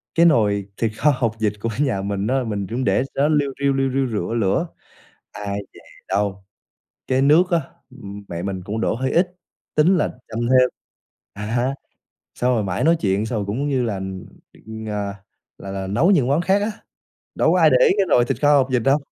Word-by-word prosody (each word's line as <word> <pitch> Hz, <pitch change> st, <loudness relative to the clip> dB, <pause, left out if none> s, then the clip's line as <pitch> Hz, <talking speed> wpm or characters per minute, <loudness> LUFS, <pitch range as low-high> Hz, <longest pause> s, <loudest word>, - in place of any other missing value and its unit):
cái 170 Hz, +1 st, +5 dB
nồi 105 Hz, -, +3 dB
thịt 115 Hz, -2 st, 0 dB
kho 150 Hz, -, +4 dB
hột 120 Hz, -5 st, -1 dB
vịt 105 Hz, -2 st, +1 dB
của 115 Hz, -, -1 dB
nhà 130 Hz, -9 st, +1 dB
mình 100 Hz, +1 st, -2 dB
á, 130 Hz, +1 st, +1 dB
mình 100 Hz, -3 st, -3 dB
cũng 120 Hz, +4 st, -2 dB
để 130 Hz, -, +2 dB
cho -, -, 0 dB
nó 155 Hz, -, +3 dB
liu 140 Hz, -2 st, 0 dB
riu 140 Hz, 0 st, +3 dB
liu 135 Hz, 0 st, 0 dB
riu 135 Hz, 0 st, 0 dB
rửa 110 Hz, -3 st, -3 dB
lửa. 115 Hz, -, +1 dB, 0.7 s
Ai 100 Hz, -1 st, -4 dB, 0.2 s
dè -, -, -14 dB, 0.3 s
đâu, 100 Hz, 0 st, -1 dB, 0.6 s
cái 130 Hz, 0 st, +1 dB
nước 160 Hz, +6 st, +4 dB
á, 170 Hz, -2 st, +3 dB, 0.3 s
ừm, 105 Hz, -6 st, -10 dB
mẹ 85 Hz, 0 st, -5 dB
mình 95 Hz, -1 st, -4 dB
cũng 105 Hz, +3 st, -3 dB
đổ -, -, 0 dB
hơi 130 Hz, +3 st, -2 dB
ít, 180 Hz, +1 st, +1 dB, 0.4 s
tính 170 Hz, +5 st, +4 dB
là 150 Hz, -, +1 dB, 0.2 s
châm 110 Hz, -, -5 dB
thêm, 125 Hz, +1 st, +4 dB, 0.6 s
à 100 Hz, -, -8 dB
ha, 125 Hz, +4 st, 0 dB, 0.6 s
xong 125 Hz, +1 st, +1 dB
rồi 110 Hz, -, 0 dB
mải 95 Hz, -1 st, -2 dB
nói 165 Hz, +2 st, +4 dB
chuyện, 100 Hz, +1 st, +1 dB
xong 110 Hz, -1 st, -2 dB
rồi 100 Hz, -, -3 dB
cũng 125 Hz, +9 st, -2 dB
như 130 Hz, -3 st, +1 dB
là, 110 Hz, -4 st, -1 dB, 0.7 s
ừm, 110 Hz, 0 st, -8 dB
ờ, 105 Hz, -1 st, -3 dB, 0.4 s
là 100 Hz, -, -8 dB
là 95 Hz, -1 st, -4 dB
nấu 130 Hz, -, +3 dB
những 145 Hz, -11 st, +3 dB
món 140 Hz, +5 st, +2 dB
khác 190 Hz, +3 st, +2 dB
á, 210 Hz, +2 st, -1 dB, 0.6 s
đâu -, -, +2 dB
có -, -, +3 dB
ai -, -, +6 dB
để -, -, +5 dB
ý 420 Hz, -, +4 dB
cái 195 Hz, -, +3 dB
rồi 120 Hz, -5 st, +4 dB
thịt -, -, -3 dB
kho 145 Hz, 0 st, +6 dB
hột 135 Hz, -1 st, +1 dB
vịt 125 Hz, -2 st, +1 dB
đâu. 135 Hz, +4 st, +3 dB
120 Hz, 225 wpm, -21 LUFS, 100-140 Hz, 0.7 s, ai